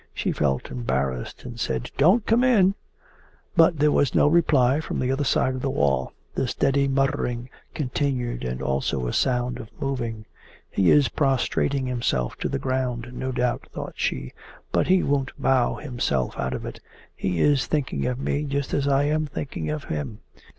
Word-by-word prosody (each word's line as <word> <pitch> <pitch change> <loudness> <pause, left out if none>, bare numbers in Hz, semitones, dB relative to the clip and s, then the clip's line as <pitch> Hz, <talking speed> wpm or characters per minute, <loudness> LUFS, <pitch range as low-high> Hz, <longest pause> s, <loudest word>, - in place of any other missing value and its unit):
She - - -1
felt 65 -3 -1
embarrassed 65 - -2
and 120 -1 -8
said: 65 - -2
'Don't 190 +10 +4
come 230 +3 +3
in!' 205 -7 +5 0.8
But 165 -1 +5
there 150 +1 +4
was 145 - +2
no - - +5
reply 145 -4 +4
from - - -4
the 130 0 0
other 135 +2 0
side 130 -1 +2
of 130 - -4
the 135 - -1
wall. 70 - +1 0.2
The 130 - -1
steady 140 +2 +1
muttering 135 -3 0 0.2
continued 130 -3 -1
and 65 +1 -3
also 65 -1 -1
a - - -2
sound 125 -1 0
of 110 - -9
moving. 120 -5 -3 0.5
'He 95 -3 +3
is 145 -2 +6
prostrating 135 -1 +1
himself 115 - -1
to - - -1
the - - -1
ground, 125 -2 -2
no 130 +1 -3
doubt,' 125 -1 -1
thought - - -6
she. 65 0 -2 0.4
'But - - +2
he 185 0 +4
won't 140 -2 -1
bow 130 -2 +2
himself 120 - -2
out 65 0 -1
of - - -6
it. - - -7 0.4
He 90 -3 -2
is 145 - +3
thinking 145 -5 -1
of 125 -1 -1
me 145 +2 -1
just 140 -1 -2
as 140 0 +1
I 140 0 +3
am 155 +1 +1
thinking 135 - -4
of 75 0 -3
him. 80 +9 -5
130 Hz, 180 wpm, -24 LUFS, 110-140 Hz, 0.8 s, is